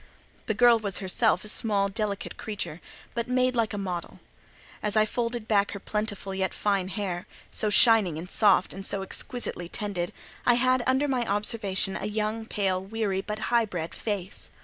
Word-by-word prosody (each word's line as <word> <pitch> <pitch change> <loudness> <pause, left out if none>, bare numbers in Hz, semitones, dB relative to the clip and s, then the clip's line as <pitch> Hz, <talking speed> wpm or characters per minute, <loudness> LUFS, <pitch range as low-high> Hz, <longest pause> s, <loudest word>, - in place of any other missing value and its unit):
The 220 - 0
girl 240 0 +6
was 200 -4 -3
herself 210 +3 +2
a - - -5
small, 210 -2 +2
delicate 200 0 -3
creature, 200 -6 -5 0.3
but 235 0 -2
made 255 0 +2
like 230 -2 +1
a 205 - -4
model. 180 -3 -4 0.6
As 210 0 0
I 215 - +5
folded 235 0 -2
back 200 -2 +2
her 200 - -5
plentiful 205 -1 -3
yet 190 0 -1
fine 200 -3 +1
hair, 185 -3 -4 0.2
so 215 - +1
shining 210 -7 +6
and 170 +3 -5
soft, 200 -1 +3
and 195 - -7
so 195 0 -1
exquisitely 190 -4 -4
tended, 185 -4 -3 0.3
I 245 - +5
had 255 +1 +3
under 265 +3 +3
my 255 -3 +1
observation 200 -2 0
a - - -3
young, 215 +1 -2
pale, 190 -4 0
weary, 200 -2 -1
but 210 +2 -4 0.2
high 235 -1 +5
bred 170 -5 -5
face. 200 -4 -2
210 Hz, 175 wpm, -27 LUFS, 195-225 Hz, 0.6 s, girl